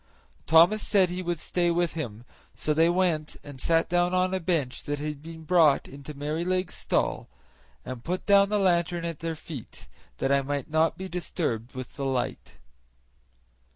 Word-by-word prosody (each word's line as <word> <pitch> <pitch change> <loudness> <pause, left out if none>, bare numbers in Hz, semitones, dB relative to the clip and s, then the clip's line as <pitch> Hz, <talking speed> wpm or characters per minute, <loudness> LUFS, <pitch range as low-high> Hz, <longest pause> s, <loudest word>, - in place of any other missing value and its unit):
Thomas 170 +7 +6
said 195 -4 +3
he 180 +1 -3
would 175 -2 -2
stay 175 +1 0
with 170 0 +1
him, 120 -8 -6 0.3
so 150 - 0
they 165 +2 +4
went 175 -4 0
and 140 -3 -10
sat 165 0 +2
down 175 +1 +2
on 185 +1 +2
a 190 - 0
bench 160 -7 -1
that 145 0 -2
had 150 0 -5
been 160 0 -10
brought 155 -4 +4
into 140 +2 -10
Merrylegs' 170 +6 -1
stall, - - -1 0.6
and 130 -2 -7
put 180 +5 -3
down 200 -1 +5
the 210 - +1
lantern 175 -3 +1
at 165 -3 -4
their 165 0 -3
feet, 150 -6 -10 0.3
that 135 - 0
I 140 0 +4
might 140 0 -3
not 160 +1 +2
be 190 - -5
disturbed 150 -10 -3
with 130 -1 -8
the 140 - -2
light. 130 -2 -2
165 Hz, 175 wpm, -27 LUFS, 145-180 Hz, 0.6 s, Thomas